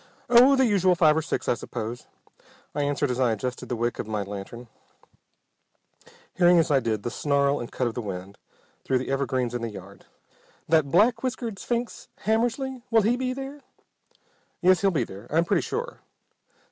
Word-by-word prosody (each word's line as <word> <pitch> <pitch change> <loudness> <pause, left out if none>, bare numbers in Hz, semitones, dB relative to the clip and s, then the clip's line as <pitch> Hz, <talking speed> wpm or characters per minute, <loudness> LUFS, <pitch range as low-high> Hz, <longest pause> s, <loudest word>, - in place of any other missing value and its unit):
"Oh, 250 +3 +7
the 265 -1 +4
usual 190 -5 +3
five 155 -4 +4
or 160 - +1
six 160 - -3
I - - +3
suppose," 115 +1 -6 0.7
I 145 - -1
answered 145 -1 0
as 125 - -3
I 125 -3 +3
adjusted 125 +3 -5
the 125 - -1
wick 120 +1 -2
of - - -4
my 105 -2 -2
lantern, 100 +5 -8 1.7
hearing 175 -1 +5
as 165 -1 +2
I 140 - +5
did 110 -4 -2
the 120 - -3
snarl 140 +1 +1
and 120 - -7
cut 130 - -1
of 120 - -1
the 120 - -4
wind 95 -1 -7 0.4
through 130 - +1
the 130 +1 -4
evergreens 130 -3 -1
in 120 - -3
the 115 - -3
yard. 100 -1 -12 0.6
"That 155 -3 +3
black 210 - +3
whiskered 245 -5 -4
sphinx, 240 -1 -3 0.2
Hammersly, 240 +4 0
will 225 -2 +4
he 230 +4 +2
be 255 0 -2
there?" 270 +2 -7 1.0
"Yes, 185 0 +4
he'll 200 - +4
be 155 -9 0
there, 100 +1 -10
I'm 165 +3 +2
pretty 175 -1 +2
sure." 470 +4 -4
145 Hz, 185 wpm, -25 LUFS, -, 1.7 s, Oh